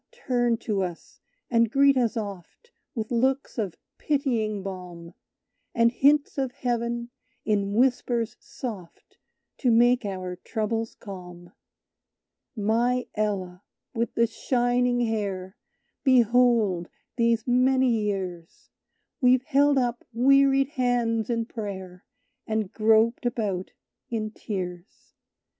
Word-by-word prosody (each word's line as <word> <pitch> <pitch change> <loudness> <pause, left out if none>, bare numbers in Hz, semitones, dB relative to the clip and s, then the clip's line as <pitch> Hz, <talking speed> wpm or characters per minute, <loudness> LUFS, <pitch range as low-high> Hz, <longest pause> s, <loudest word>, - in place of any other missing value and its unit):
turn 240 -2 +2
to 210 -3 -2
us, 175 -3 -6 0.3
and 230 -1 +3
greet 275 +3 +4
us 240 -2 +1
oft 205 - -7 0.2
With 220 -1 -4
looks 260 +2 0
of 200 -6 -3 0.2
pitying 230 -9 0
balm, 180 -3 -8 0.6
And 230 -1 +4
hints 285 +3 +3
of 265 -2 -1
heaven, 235 -1 -2 0.3
in 200 -1 0
whispers 240 -2 +1
soft, 205 -9 -9 0.4
To 255 - +2
make 240 +2 +4
our 185 -3 -4
troubles 225 +3 -3
calm. 180 -3 -10 1.0
"My 235 +4 +1
Ella 195 -4 -2 0.3
with 235 -1 -2
the 235 - +4
shining 245 +1 +1
hair, 200 -4 -2 0.5
Behold, 235 - +3 0.3
these 230 -2 +2
many 260 +1 +3
years, 190 -6 -3 0.5
We've 255 0 +4
held 285 0 +3
up 245 -2 0
wearied 275 +2 +4
hands 245 -5 0
in 230 -1 0
prayer; 190 -6 -7 0.4
And 220 -2 -2
groped 225 +2 +3
about 205 -6 -2 0.4
in 215 -2 -3
tears." 180 -3 -7
230 Hz, 110 wpm, -26 LUFS, 200-245 Hz, 1.0 s, greet